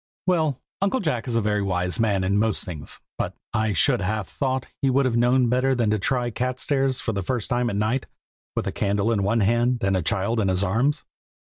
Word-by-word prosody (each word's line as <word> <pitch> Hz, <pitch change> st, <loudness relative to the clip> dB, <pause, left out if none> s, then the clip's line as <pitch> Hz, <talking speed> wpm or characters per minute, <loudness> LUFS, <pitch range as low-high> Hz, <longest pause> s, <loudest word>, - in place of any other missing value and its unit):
Well, 160 Hz, -7 st, +1 dB, 0.2 s
Uncle 200 Hz, +6 st, +1 dB
Jack 150 Hz, -, -2 dB
is 120 Hz, -, -1 dB
a 115 Hz, -, +3 dB
very 105 Hz, -1 st, +1 dB
wise 90 Hz, -1 st, -1 dB
man 105 Hz, -4 st, +2 dB
in 100 Hz, +2 st, +1 dB
most 110 Hz, -1 st, +1 dB
things, 80 Hz, -8 st, -6 dB, 0.2 s
but -, -, -2 dB, 0.2 s
I 110 Hz, 0 st, +1 dB
should 90 Hz, -, +2 dB
have 105 Hz, +1 st, -2 dB
thought 130 Hz, -2 st, -2 dB, 0.2 s
he 135 Hz, -, +3 dB
would 135 Hz, +1 st, +3 dB
have 125 Hz, -3 st, +1 dB
known 125 Hz, +1 st, +3 dB
better 130 Hz, +2 st, +2 dB
than 115 Hz, -4 st, +1 dB
to 110 Hz, -, +1 dB
try 125 Hz, +4 st, +1 dB
the 120 Hz, -, -2 dB
cat 125 Hz, +3 st, -2 dB
stairs 135 Hz, -2 st, 0 dB
for 115 Hz, -, -2 dB
the 100 Hz, -, -1 dB
first 120 Hz, +4 st, -3 dB
time 120 Hz, 0 st, +1 dB
at 100 Hz, -, -3 dB
night, 110 Hz, +6 st, 0 dB, 0.5 s
with -, -, -1 dB
a -, -, -1 dB
candle 100 Hz, +2 st, 0 dB
in 105 Hz, -3 st, +1 dB
one 110 Hz, +4 st, +1 dB
hand, 120 Hz, +3 st, +2 dB
and 95 Hz, 0 st, +2 dB
a 95 Hz, -, +1 dB
child 100 Hz, +7 st, 0 dB
in 100 Hz, -, +1 dB
his 95 Hz, +1 st, +1 dB
arms. 125 Hz, +10 st, +1 dB
115 Hz, 235 wpm, -24 LUFS, 100-130 Hz, 0.5 s, a